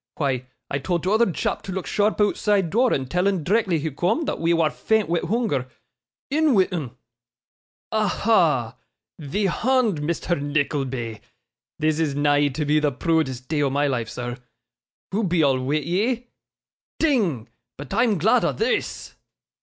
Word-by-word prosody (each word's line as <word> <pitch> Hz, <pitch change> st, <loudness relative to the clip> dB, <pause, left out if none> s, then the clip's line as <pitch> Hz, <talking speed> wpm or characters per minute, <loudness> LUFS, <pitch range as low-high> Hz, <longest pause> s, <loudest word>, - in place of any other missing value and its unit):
Why, 130 Hz, -4 st, -1 dB, 0.2 s
I 140 Hz, -, 0 dB
told 170 Hz, +3 st, -2 dB
t'oother 215 Hz, +2 st, +3 dB
chap -, -, -2 dB
to 190 Hz, -, -7 dB
look 190 Hz, 0 st, -4 dB
sharp 210 Hz, +1 st, +1 dB
ootside 205 Hz, -3 st, +1 dB
door, 245 Hz, +3 st, +3 dB
and 135 Hz, -, 0 dB
tell 180 Hz, +7 st, +1 dB
'un 190 Hz, -5 st, 0 dB
d'rectly 195 Hz, -1 st, +2 dB
he 155 Hz, +1 st, -3 dB
coom, 180 Hz, -, 0 dB
thot 300 Hz, -, -3 dB
we 165 Hz, +1 st, +2 dB
war 165 Hz, -3 st, +2 dB
faint 220 Hz, +4 st, 0 dB
wi' 170 Hz, 0 st, +2 dB
hoonger. 175 Hz, -, -1 dB, 0.6 s
In 305 Hz, -2 st, +3 dB
wi' 190 Hz, -2 st, +4 dB
'un. 140 Hz, -9 st, -4 dB, 1.0 s
Aha! 180 Hz, -, +2 dB, 0.4 s
Thee 160 Hz, +8 st, -2 dB
hond, 225 Hz, -, +1 dB
Misther 170 Hz, +3 st, -1 dB
Nickleby. 140 Hz, -5 st, -2 dB, 0.6 s
This 155 Hz, 0 st, 0 dB
is 150 Hz, -4 st, 0 dB
nigh 145 Hz, 0 st, +3 dB
to 150 Hz, +2 st, -3 dB
be 150 Hz, +1 st, +3 dB
the 150 Hz, -1 st, +1 dB
proodest 130 Hz, -3 st, -1 dB
day 150 Hz, -2 st, 0 dB
o' 140 Hz, -, +2 dB
my 145 Hz, +2 st, +1 dB
life, 120 Hz, -5 st, -1 dB
sir. 120 Hz, +1 st, -5 dB, 0.7 s
Hoo 210 Hz, +4 st, 0 dB
be 175 Hz, -4 st, +2 dB
all 135 Hz, -2 st, +3 dB
wi' 130 Hz, +3 st, -1 dB
ye? 215 Hz, -, -1 dB, 0.7 s
Ding! 200 Hz, -, +1 dB, 0.3 s
But, 145 Hz, +4 st, -8 dB
I'm 225 Hz, -1 st, +2 dB
glod 220 Hz, +9 st, +3 dB
o' -, -, +1 dB
this! 445 Hz, -, -2 dB
165 Hz, 160 wpm, -23 LUFS, 140-205 Hz, 1.0 s, wi